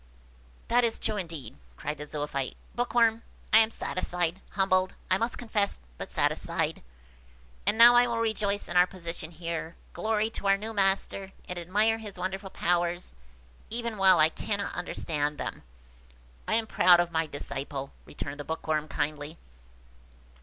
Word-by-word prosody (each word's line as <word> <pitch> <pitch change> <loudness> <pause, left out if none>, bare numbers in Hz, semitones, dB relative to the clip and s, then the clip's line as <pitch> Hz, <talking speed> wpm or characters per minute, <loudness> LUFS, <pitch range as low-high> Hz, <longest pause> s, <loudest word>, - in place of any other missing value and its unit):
"That 245 +1 +3
is 230 -1 +2
true 215 - -2
indeed," 165 - -6 0.2
cried 150 - -4
the 150 - -6
Zoophyte. 145 -3 -3 0.2
"Bookworm! 235 -2 +2 0.3
I 220 - +10
am 220 0 +4
satisfied–humbled, 185 0 -1 0.2
I 185 - +4
must 230 +1 -1
confess, 215 -4 -1 0.2
but - - -6
satisfied. - - 0 0.9
And 205 +1 +3
now 235 +1 +10
I 245 0 +6
will 235 -1 -1
rejoice 215 -3 0
in - - -6
our 180 0 +6
position 170 -3 -6
here, 170 0 -5 0.2
glory 220 0 0
in - - -4
our 195 0 +4
new 220 +3 -6
master, 195 -1 +1
and 180 -1 -4
admire 210 +6 +2
his 210 -4 -8
wonderful 190 +2 -4
powers, 175 0 0 0.6
even 235 0 -2
while 190 -2 +6
I 155 +1 +6
cannot 200 +3 -2
understand 150 -4 -1
them." - - -5 0.9
"I - - +2
am 225 0 +2
proud 180 -4 +6
of 175 0 +1
my 160 -1 0
disciple," 140 -1 -5 0.2
returned 145 0 -6
the - - -4
Bookworm 155 0 -2
kindly. 150 +1 -3
185 Hz, 150 wpm, -28 LUFS, 160-220 Hz, 0.9 s, I